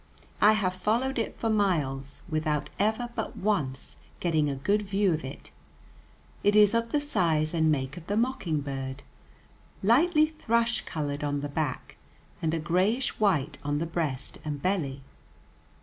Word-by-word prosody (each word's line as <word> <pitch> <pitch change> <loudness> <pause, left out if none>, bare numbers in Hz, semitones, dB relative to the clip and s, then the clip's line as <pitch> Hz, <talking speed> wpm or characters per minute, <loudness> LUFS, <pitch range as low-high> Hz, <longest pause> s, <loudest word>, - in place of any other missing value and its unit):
I 210 +1 +7
have 195 -4 +1
followed 235 +8 0
it 225 - -3
for 230 - -1
miles, 155 -11 0
without 155 -2 -1
ever 220 +4 +1
but 225 -2 -4
once 150 -11 -1 0.2
getting 160 -4 +1
a 140 - -2
good 200 +11 +1
view 200 -2 +1
of 155 - -3
it. 135 +2 -9 0.9
It 205 +1 +4
is 210 0 +6
of 230 0 0
the 295 - +2
size 170 - +1
and 160 -2 +3
make 135 0 -2
of 170 -1 -10
the 205 - 0
mockingbird, 145 - -2 0.8
lightly 305 - +5
thrush 235 -7 0
colored 145 -1 -3
on 145 -1 -1
the 145 - -4
back, 145 -3 -3 0.4
and 160 - +1
a - - -1
grayish 190 +11 +1
white 165 -9 +1
on 145 0 0
the 165 - -1
breast 155 -6 -3
and 150 -2 -3
belly. 140 -7 -1
170 Hz, 155 wpm, -28 LUFS, 145-215 Hz, 0.9 s, I